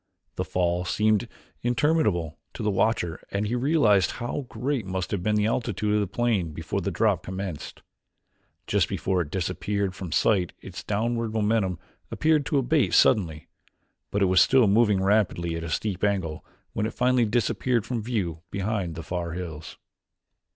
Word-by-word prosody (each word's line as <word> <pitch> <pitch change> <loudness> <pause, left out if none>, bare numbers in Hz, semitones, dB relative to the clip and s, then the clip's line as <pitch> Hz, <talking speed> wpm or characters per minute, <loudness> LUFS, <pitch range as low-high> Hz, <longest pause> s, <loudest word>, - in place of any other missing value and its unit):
The - - -2
fall 90 -1 0
seemed 105 +2 +1 0.3
interminable 120 - +1 0.2
to - - -5
the 105 - +1
watcher 95 -5 0
and 100 +1 -1
he 110 - -2
realized 125 - +3
how 125 +2 -4
great 135 -2 -2
must 95 0 -4
have 100 - -1
been 105 +3 +1
the 105 0 +2
altitude 110 -2 0
of 105 - +3
the 100 - 0
plane 100 -6 0
before - - -3
the - - -1
drop - - +1
commenced. 95 -4 -6 0.8
Just - - +1
before 95 -2 0
it 75 - -4
disappeared 95 +2 -2
from 95 -3 -7
sight 90 +2 +2
its - - -9
downward 115 +1 -1
momentum 105 -4 +1 0.3
appeared 155 -2 +2
to 145 - +1
abate 140 +2 +2
suddenly, 80 -9 +3 0.6
but 100 0 +1
it - - +5
was 95 -1 +5
still 130 -3 +5
moving 105 -2 +3
rapidly 95 -5 +1
at 80 - -4
a 85 - -5
steep 95 +5 -2
angle 95 -7 -1 0.3
when 110 -1 -1
it 110 - -8
finally 125 -1 +3
disappeared 120 +1 0
from 120 0 -2
view 100 -8 -2
behind 100 -3 -2
the 80 - -6
far 85 -1 -3
hills. 85 -3 -7
105 Hz, 165 wpm, -26 LUFS, 90-115 Hz, 0.8 s, it